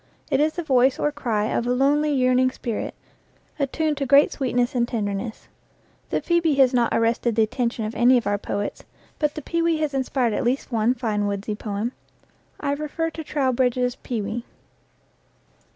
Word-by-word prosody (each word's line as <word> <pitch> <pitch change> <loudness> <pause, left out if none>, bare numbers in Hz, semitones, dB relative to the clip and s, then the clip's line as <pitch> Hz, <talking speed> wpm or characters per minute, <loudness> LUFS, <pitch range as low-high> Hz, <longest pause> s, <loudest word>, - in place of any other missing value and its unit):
It 270 - +3
is 310 +1 +2
the 345 - -4
voice 260 -3 +3
or 295 - 0
cry 235 -8 -1
of 235 +2 -1
a - - +1
lonely, 290 +4 +2
yearning 255 -1 +3
spirit, 235 -3 -4 0.6
attuned 295 +2 0
to 275 -1 -2
great 280 +3 +6
sweetness 245 -3 0
and 240 -2 +1
tenderness. 215 -1 -4 0.6
The - - 0
phcebe 335 -4 +2
has 265 -2 +5
not 240 -2 +2
arrested 230 0 +1
the 225 - +4
atten 245 +2 0
tion 230 -2 -5
of 215 - -4
any 250 +1 +5
of 240 - -1
our 205 0 0
poets, 205 0 -4 0.4
but 300 -1 0
the 305 - -6
pewee 335 0 +1
has 305 -2 -1
inspired 260 -3 0
60 - - -1
EACH - - -1
AFTER 245 -2 +2
ITS 275 - -7
KIND - - -30
at 225 - +1
least 215 - +2
one - - +4
fine 215 -4 -1
woodsy 200 +1 -3
poem. 210 +2 -3 0.7
I 280 - -1
refer 305 +3 -2
to 320 - -7
Trow 280 -3 0
bridge's 250 0 +1
"Pewee." 225 0 -4
250 Hz, 200 wpm, -23 LUFS, 230-285 Hz, 0.7 s, great